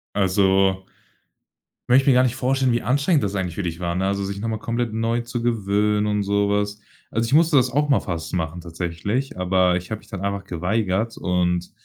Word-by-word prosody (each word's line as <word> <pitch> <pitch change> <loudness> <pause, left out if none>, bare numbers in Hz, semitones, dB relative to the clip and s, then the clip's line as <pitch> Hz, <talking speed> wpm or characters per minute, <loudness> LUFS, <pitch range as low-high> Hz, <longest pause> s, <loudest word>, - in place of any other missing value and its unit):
Also 95 -1 +2 1.0
möchte 130 +3 +4
mir 130 - +6
gar 125 - +5
nicht 130 0 0
vorstellen, 130 -1 +1
wie 120 - 0
anstrengend 140 - +2
das 100 0 -2
eigentlich 90 -3 -3
für 100 - -2
dich 85 0 -4
war, 85 -1 -2
ne, 95 +1 0
also 100 0 -1
sich 100 0 -5
noch 115 - -3
mal 110 -1 -2
komplett 115 0 -2
neu 115 +1 0
zu 120 0 -5
gewöhnen 105 -2 +1
und 105 -1 0
so 100 0 +1
was. 105 0 -1 0.3
Also, 115 +1 0
ich 135 - -1
musste 160 -1 +5
das 125 -1 +4
auch 145 +3 +1
mal 135 -8 +3
fast 80 -3 -5
machen 85 0 -2
tatsächlich, 90 +10 -3
aber 90 -1 +2
ich 90 +2 -5
habe 110 - -3
mich - - -21
dann 100 -4 -6
einfach 100 -1 -2
geweigert 100 +5 -1
und, 90 -1 0
100 Hz, 215 wpm, -22 LUFS, 90-120 Hz, 1.0 s, mir